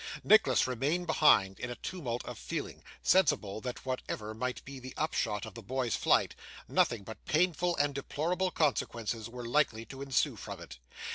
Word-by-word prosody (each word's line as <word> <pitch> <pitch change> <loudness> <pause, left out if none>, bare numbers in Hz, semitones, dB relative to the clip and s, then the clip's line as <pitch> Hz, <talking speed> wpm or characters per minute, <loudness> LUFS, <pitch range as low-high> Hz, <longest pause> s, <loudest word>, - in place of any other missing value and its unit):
Nicholas 135 - +5
remained 140 +8 0
behind, 145 - +4
in 125 - -4
a 120 - -4
tumult 125 -5 -4
of - - -7
feeling, - - -5 0.2
sensible 110 - +3
that 125 -1 -6
whatever 110 -4 -3
might 125 +3 -3
be 135 0 -8
the 130 0 -9
upshot 110 -9 -1
of 110 - -9
the 115 - -9
boy's 125 +1 -1
flight, - - +3 0.3
nothing 115 -4 +2
but 110 0 -10
painful 175 +2 +2
and 145 0 +2
deplorable 160 +7 -1
consequences 115 -8 -1
were 120 0 -7
likely 115 -3 +1
to 135 +2 -9
ensue 135 -3 +1
from - - -7
it. - - -10
130 Hz, 165 wpm, -32 LUFS, 115-150 Hz, 0.3 s, Nicholas